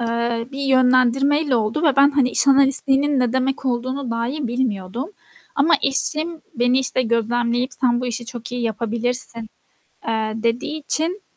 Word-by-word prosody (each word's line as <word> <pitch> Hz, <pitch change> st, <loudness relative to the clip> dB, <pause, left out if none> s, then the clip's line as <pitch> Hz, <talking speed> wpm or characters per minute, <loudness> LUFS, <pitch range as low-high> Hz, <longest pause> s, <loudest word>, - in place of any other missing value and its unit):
eee, 235 Hz, 0 st, -2 dB
bir 275 Hz, -, -7 dB
yönlendirmeyle 260 Hz, +2 st, +2 dB
oldu 225 Hz, +7 st, -2 dB
ve 295 Hz, -5 st, +2 dB
ben 280 Hz, +1 st, +5 dB
hani 275 Hz, -3 st, +1 dB
iş -, -, +2 dB
analistliğinin 275 Hz, +1 st, +5 dB
ne 245 Hz, -2 st, 0 dB
demek 260 Hz, +1 st, -2 dB
olduğunu 255 Hz, +1 st, -3 dB
dahi 245 Hz, +5 st, -3 dB
bilmiyordum 235 Hz, -, -3 dB, 0.4 s
ama 295 Hz, +4 st, +3 dB
eşim 310 Hz, +4 st, -1 dB
beni, 245 Hz, +1 st, +1 dB
işte, 255 Hz, -1 st, 0 dB
gözlemleyip 235 Hz, +1 st, -1 dB
"Sen 240 Hz, -2 st, +1 dB
bu 250 Hz, -, -4 dB
işi 240 Hz, 0 st, -5 dB
çok 240 Hz, 0 st, -9 dB
iyi 245 Hz, -1 st, -4 dB
yapabilirsin." 230 Hz, +1 st, -3 dB, 0.6 s
eee, 220 Hz, -1 st, -2 dB
dediği 240 Hz, +7 st, -2 dB
için 325 Hz, +6 st, -2 dB
250 Hz, 150 wpm, -20 LUFS, 235-275 Hz, 0.6 s, ben